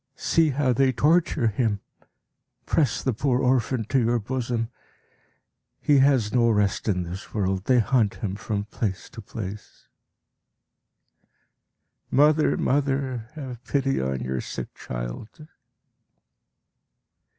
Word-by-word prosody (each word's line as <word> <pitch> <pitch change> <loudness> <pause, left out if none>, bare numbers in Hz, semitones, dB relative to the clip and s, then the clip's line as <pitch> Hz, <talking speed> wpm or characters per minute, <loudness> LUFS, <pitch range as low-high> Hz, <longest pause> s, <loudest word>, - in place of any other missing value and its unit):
See 165 -2 +2
how 135 -2 +1
they 130 +2 +3
torture 155 +1 +2
him! 105 -1 0 0.9
Press 150 -5 +1
the 130 - +1
poor 125 +2 +1
orphan 125 -2 +1
to 135 - +3
your 120 0 +2
bosom! 120 0 -2 1.1
He 145 -2 +4
has 130 -6 +3
no 120 -2 +4
rest 105 -2 +1
in 90 -3 +1
this 90 +5 -8
world; 95 -2 -1
they 130 - +4
hunt 115 -3 +2
him 100 -5 -4
from 100 -1 -3
place 105 -3 -4
to 115 - -9
place. 105 -1 -8 2.2
Mother, 150 +3 +4
mother, 135 -4 0
have 130 -5 -7
pity 135 - 0
on 65 0 -2
your 65 0 -2
sick - - -6
child! - - -7
120 Hz, 115 wpm, -25 LUFS, 105-135 Hz, 2.2 s, He